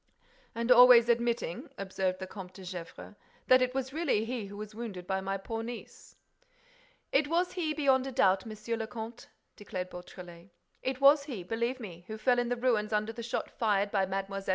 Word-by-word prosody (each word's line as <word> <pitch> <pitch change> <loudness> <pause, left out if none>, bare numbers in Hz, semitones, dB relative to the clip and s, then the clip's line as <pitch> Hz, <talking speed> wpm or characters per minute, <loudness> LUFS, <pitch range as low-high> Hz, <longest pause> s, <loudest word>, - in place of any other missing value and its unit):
"And 235 +2 0
always 245 -1 +8
admitting," 235 -6 0
observed 190 -1 -2
the 190 - -6
Comte 185 -1 -9
de 190 - -10
Gesvres, 180 +1 -8 0.3
"that 255 0 +6
it 255 0 0
was 265 0 -2
really 290 -9 +1
he 230 -3 -4
who 200 +1 -10
was 215 0 -7
wounded 210 -6 -6
by 190 +1 -1
my 195 +1 -2
poor 225 +3 -5
niece." 235 +1 -9 1.0
"It 285 +2 +3
was 345 +3 +1
he, 335 -4 -2
beyond 270 -3 +3
a - - -4
doubt, 195 -5 +3
Monsieur 215 +1 -4
le 220 -1 -4
Comte," 225 +2 -8 0.3
declared 185 -3 -6
Beautrelet; 180 0 -11 0.3
"it 260 0 -3
was 280 +1 +6
he, 240 - -6
believe 235 +6 -2
me, 175 -7 -9
who 220 - -6
fell 245 +2 +2
in 240 0 0
the 245 - +1
ruins 230 -4 +1
under 215 +1 0
the 235 - -7
shot 230 0 -3
fired 205 -3 +1
by 195 -2 +1
Mlle. 195 +1 -3
225 Hz, 195 wpm, -30 LUFS, 195-250 Hz, 1.0 s, always